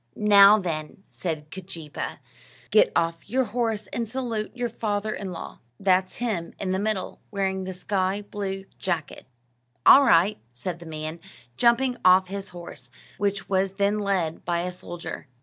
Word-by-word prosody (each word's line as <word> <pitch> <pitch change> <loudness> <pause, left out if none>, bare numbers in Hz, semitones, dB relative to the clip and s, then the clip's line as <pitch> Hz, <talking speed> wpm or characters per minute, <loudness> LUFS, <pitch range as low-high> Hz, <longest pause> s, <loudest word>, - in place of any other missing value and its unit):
"Now, 205 0 +7
then," 165 -2 -4
said 155 -4 -5
Keejeepaa, 170 -5 -6 0.5
"get - - +5
off 165 +2 0
your 260 +4 +2
horse 225 -2 -1
and 230 -2 -2
salute 230 -4 -3
your 245 0 0
father 215 -2 -2
in 195 -2 -5
law. 170 - -8 0.2
That's 185 -1 +2
him 210 -9 -3
in 190 -2 -2
the 190 - 0
middle, 205 -2 -2
wearing 190 -2 -1
the 190 - -4
sky 190 +1 -1
blue 195 -2 -4
jacket." 170 -8 -3 0.6
"All 280 - +9
right," 185 -3 +4
said 165 +8 -5
the 170 - -11
man, 155 +1 -5 0.4
jumping 245 - +3
off 185 0 +6
his 195 0 -5
horse, 170 -8 -10 0.3
which 200 0 -1
was 190 0 +1
then 200 +1 +1
led 190 -6 -1
by 170 0 0
a 180 +1 -3
soldier. 175 -3 -8
190 Hz, 155 wpm, -25 LUFS, 175-210 Hz, 0.6 s, All